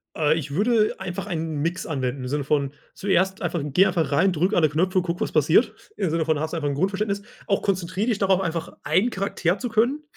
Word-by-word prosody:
Äh, 155 0 +2
ich 145 -3 -5
würde 215 +2 +2
einfach 180 +2 -5
einen 160 -5 -3
Mix 170 +4 -2
anwenden, 130 -3 -2
im - - -4
Sinne 145 +2 -1
von 140 -1 0 0.2
zuerst 190 +1 0
einfach 175 -2 -1
geh 150 +6 +3
einfach 175 -6 0
rein, 170 +7 +3
drücke 180 +5 +1
alle 155 -3 +4
Knöpfe 185 +5 +1
und - - -2
gucke, 175 -1 -3
was - - -1
passiert, - - +3 0.2
im 190 - 0
Sinne 160 0 0
von 155 -2 +1
hast 155 +1 -2
du 170 - -3
einfach 145 -3 -1
'n 140 - -2
Grundverständnis. 200 +5 -1 0.3
Auch 200 -3 +1
konzentriere 185 +2 -1
dich 230 -5 +1
darauf 195 -2 +3
einfach 165 -3 -3
einen 185 +10 +2
Charakter 195 -3 -1
zu 245 - -3
können. 240 +7 +1
175 Hz, 230 wpm, -24 LUFS, 155-195 Hz, 0.3 s, alle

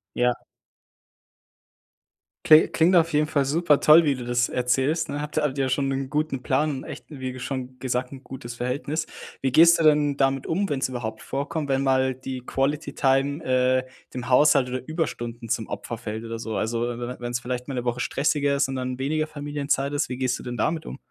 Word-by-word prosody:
Ja. 125 0 +2 2.1
Kli 155 0 +7
klingt 175 +3 +3
auf 165 -1 +3
jeden 150 +1 +2
Fall 145 -2 +1
super 150 +1 +2
toll, 160 +2 +7
wie 145 -2 +2
du 125 -2 -6
das 120 0 +1
erzählst, 135 +6 0
ne? 145 - -3
Habt 150 +1 -6
ihr 155 - +2
habt 145 -2 -1
ihr 135 - +2
ja - - -1
schon 135 +2 0
'nen 135 0 -2
guten 150 -3 -2
Plan 145 +5 +1
und 135 -2 -5
echt, - - -8
wie 130 -3 -5
ge 130 - -9
schon 130 0 -5
gesagt, 125 0 -2
'n 135 0 -10
gutes 125 -3 -8
Verhältnis. 140 +6 -2 0.4
Wie 135 -1 0
gehst 170 +4 +7
du - - +1
denn 150 -2 +4
damit 135 -1 +1
um, 195 +5 0
wenn's 135 -2 0
überhaupt 115 -4 -5
vorkommt, 145 +2 -3
wenn 135 0 +1
mal 130 -1 +2
die 130 0 -6
Quality-Time, 135 +1 0
äh, 130 0 +2 0.3
dem 125 -1 -5
Haushalt 140 0 +5
oder 130 +1 -2
Überstunden 120 -8 -4
zum 115 -2 -1
Opfer 105 +3 -6
fällt, 110 -1 -6
oder 115 0 -5
so? 110 -1 -4
Also, 115 +1 -1
we 120 0 -2
we 120 +1 -5
wenn's 120 0 -3
vielleicht 125 +1 -4
mal 135 - -4
'ne 125 -1 -3
Woche 120 0 -1
stressiger 140 +1 +1
ist 140 - +1
und 135 - -4
dann 130 0 -3
weniger 155 +3 0
Familienzeit 145 -2 -2
ist, 145 +1 0
wie 125 - -4
gehst 125 -1 -1
du - - -10
denn 125 -1 -5
damit 160 +5 -1
um? - - -7
135 Hz, 215 wpm, -24 LUFS, 125-145 Hz, 2.1 s, Kli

